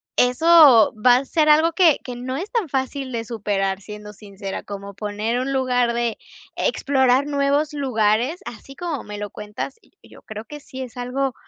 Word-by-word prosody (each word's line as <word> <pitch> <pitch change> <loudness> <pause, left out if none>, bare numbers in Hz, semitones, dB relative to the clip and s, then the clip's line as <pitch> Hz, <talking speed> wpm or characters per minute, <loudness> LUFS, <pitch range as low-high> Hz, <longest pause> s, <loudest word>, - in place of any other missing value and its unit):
eso 265 -2 +6
va 245 -1 +7
a 270 - -3
ser 305 +2 +1
algo 315 +2 +5
que 330 -4 +4
que 250 - -7
no 255 +2 -5
es 375 +8 -6
tan 455 -9 -1
fácil 265 0 -3
de 230 -2 -4
superar, 200 -4 -2
siendo 210 0 -10
sincera, 200 -1 -7
como 200 0 -8
poner 210 +4 -3
un 260 +2 -2
lugar 250 -2 +1
de 235 -1 -2 0.4
explorar 265 -1 +2
nuevos 285 +1 0
lugares, 250 - 0
así 255 +4 -10
como 335 -4 -4
me 210 0 -8
lo 205 0 -6
cuentas, 210 +6 -7
y - - -28 0.2
yo - - -16
creo 215 0 -9
que 295 +5 -9
sí 270 -2 -9
es 250 0 -11
algo 255 +2 -2
250 Hz, 185 wpm, -21 LUFS, 215-280 Hz, 0.4 s, va